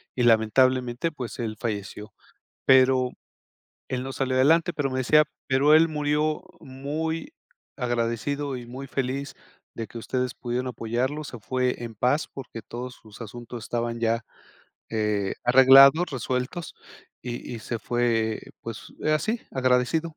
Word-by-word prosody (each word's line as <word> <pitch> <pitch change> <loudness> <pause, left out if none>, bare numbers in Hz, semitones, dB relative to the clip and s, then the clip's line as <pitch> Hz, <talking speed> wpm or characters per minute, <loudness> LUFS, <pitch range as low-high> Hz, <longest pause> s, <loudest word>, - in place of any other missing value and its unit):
y 125 - -1
lamentablemente, 125 +5 +3
pues 130 -5 -7
él 110 -2 -3
falleció. 105 -2 -5 0.5
Pero 130 -1 +5 0.8
él 125 -1 -2
no 135 +1 -5
salió 130 -1 -1
adelante, 165 +6 +4
pero 145 -3 -1
me 130 - -2
decía, 150 +4 +5 0.2
pero 140 +3 +4
él 160 +1 +7
murió 150 0 0 0.2
muy 150 +5 -4 0.4
agradecido 125 +3 -1
y 120 -1 -8
muy 130 +3 -8
feliz 135 +2 -3 0.4
de 115 -1 -5
que 120 - -9
ustedes 125 +1 -2
pudieron 125 +1 -3
apoyarlo, 125 +5 -2
se 125 -4 -8
fue 125 +1 -1
en 115 -1 -7
paz 130 +8 +1
porque 130 -4 -8
todos 125 +4 -7
sus 110 +1 -15
asuntos 120 +1 -8
estaban 115 +1 -2
ya, 115 0 +1 0.6
eh, 105 -3 -1
arreglados, 135 +6 +8
resueltos 130 +6 -3 0.5
y 120 0 -6
y - - -7
se 115 +1 -4
fue, 115 -2 0 0.2
pues, - - -8 0.2
así, 215 +10 0
agradecido. 130 +5 +1
130 Hz, 135 wpm, -25 LUFS, 120-140 Hz, 0.8 s, arreglados